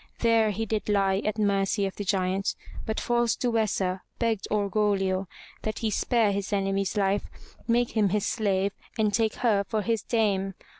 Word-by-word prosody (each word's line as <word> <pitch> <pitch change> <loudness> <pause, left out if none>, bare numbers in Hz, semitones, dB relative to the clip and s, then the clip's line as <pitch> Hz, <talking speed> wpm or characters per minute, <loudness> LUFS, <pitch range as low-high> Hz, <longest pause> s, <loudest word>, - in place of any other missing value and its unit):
There 230 -2 +4
he 220 +2 -2
did 215 0 -2
lie 195 -2 +2
at 215 +1 -1
mercy 200 -1 +1
of 195 - -4
the 205 - -4
giant, 190 0 0 0.3
but 220 - -1
false 240 -1 +1
Duessa 210 -6 0 0.2
begged 225 -4 0
Orgoglio 200 -2 +1 0.3
that 215 -1 -3
he 220 -2 -1
spare 225 -1 +2
his 200 0 -3
enemy's 195 0 0
life, 200 0 +1 0.4
make 240 0 +2
him 210 -3 +2
his 205 +1 0
slave, 200 -3 +1 0.3
and 215 -2 +2
take 220 0 +1
her 210 -5 +2
for 215 +1 -2
his 225 -1 0
dame. 195 -5 0
205 Hz, 165 wpm, -27 LUFS, 195-220 Hz, 0.4 s, There